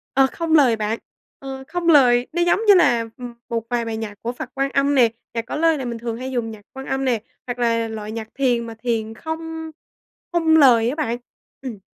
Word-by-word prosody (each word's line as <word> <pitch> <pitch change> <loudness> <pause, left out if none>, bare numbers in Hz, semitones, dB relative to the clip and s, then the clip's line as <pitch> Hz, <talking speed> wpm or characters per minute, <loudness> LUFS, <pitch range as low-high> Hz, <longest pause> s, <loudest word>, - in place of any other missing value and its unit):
Ờ, 270 0 +5
không 330 -1 -2
lời 265 -7 +5
bạn, 220 +1 -2 0.4
ờ 265 -1 -7
không 350 0 -3
lời, 250 -5 +5
nó 345 - 0
giống 345 +3 +3
như 410 - +9
là, 240 -11 +4
ừm, 245 -2 -7 0.2
một 230 -1 -1
vài 240 -1 0
bài 225 -1 -3
nhạc 220 -2 -5
của 235 - -2
Phật 245 +1 -7
Quan 275 0 0
Âm 280 +1 +2
nè, 245 -4 +5 0.2
nhạc 230 -1 -2
có - - -5
lời 325 0 +3
này 265 - -4
mình 235 -1 -4
thường 230 -1 -4
hay 260 +2 -5
dùng 235 -3 -2
nhạc 215 -1 -11
Quan 265 0 -8
Âm 270 0 -1
nè, 240 -4 +1 0.3
hoặc 245 0 -4
là 230 -1 +1
loại 215 -1 -6
nhạc 220 -1 -5
thiền 245 -4 +1
mà 225 - -8
thiền 225 -2 -2
không 320 +4 -6 0.6
không 325 -2 +4
lời 240 -6 +6
á 265 - -2
bạn. 265 -7 -1 0.4
Ừm. 250 -6 -6
245 Hz, 230 wpm, -21 LUFS, 230-285 Hz, 0.6 s, như